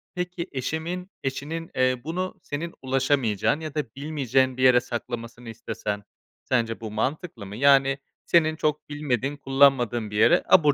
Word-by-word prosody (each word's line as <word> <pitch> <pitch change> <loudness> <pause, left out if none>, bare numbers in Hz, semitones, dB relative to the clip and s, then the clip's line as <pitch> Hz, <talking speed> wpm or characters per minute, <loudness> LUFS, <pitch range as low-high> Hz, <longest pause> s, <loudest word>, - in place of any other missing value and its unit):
Peki, 180 0 -3
eşimin 165 +8 -4
eşinin, 150 +5 -4
eee, 130 -1 +2
bunu 180 +5 -3
senin 165 +4 -4
ulaşamayacağın 130 -2 +1
ya 155 -2 -7
da 150 - +1
bilmeyeceğin 135 -3 0
bir 130 - 0
yere 125 -1 +6
saklamasını 120 -1 -6
istesen 105 -2 -4 0.4
sence 115 -3 0
bu 110 -2 -5
mantıklı 130 - -3
mı? 100 +1 -8
Yani, 135 +2 +4 0.3
senin 160 -2 +3
çok 150 -1 -1
bilmediğin, 145 -1 -2
kullanmadığın 135 -5 +3
bir 105 - -3
yere 140 +11 +5
abur 150 -6 +6
135 Hz, 145 wpm, -25 LUFS, 120-155 Hz, 0.4 s, yere